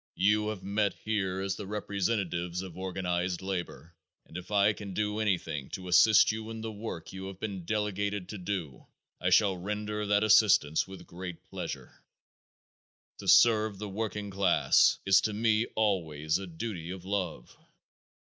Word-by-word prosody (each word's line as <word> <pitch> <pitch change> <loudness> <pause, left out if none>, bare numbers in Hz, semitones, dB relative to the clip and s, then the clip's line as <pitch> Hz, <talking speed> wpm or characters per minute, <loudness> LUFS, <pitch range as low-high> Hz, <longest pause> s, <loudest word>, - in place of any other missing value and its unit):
You 105 +2 +2
have 105 -3 -4
met 100 -1 0
here 95 -4 -1
as 95 0 -2
the 100 - -7
representatives 95 -4 -2
of 95 -3 -9
organized 90 -1 -2
labor 90 -3 -5 0.3
and - - -17
if 90 0 -7
I 105 0 +3
can 100 -3 -8
do 105 0 -1
anything 90 -10 -1
to 90 -1 -10
assist 105 +6 +6
you 110 0 -6
in 115 0 -6
the 110 0 -4
work 100 -7 -7
you 95 0 -6
have 95 -1 -9
been 100 -5 -5
delegated 100 -1 -2
to 105 - -6
do 90 -7 -5 0.3
I - - +1
shall 100 -4 +4
render 105 +2 -3
that 105 +1 +3
assistance 105 -9 +4
with 95 0 -11
great 90 -1 -8
pleasure. - - -7 1.2
To - - -8
serve 110 -3 +5
the 105 +1 -6
working 105 0 -4
class 95 -2 +4
is 95 0 +6
to 110 - -1
me 110 +1 +2
always 80 -7 0
a 95 - -7
duty 85 0 -5
of 90 0 -7
love. 95 -10 -3
100 Hz, 160 wpm, -30 LUFS, 90-105 Hz, 1.2 s, assist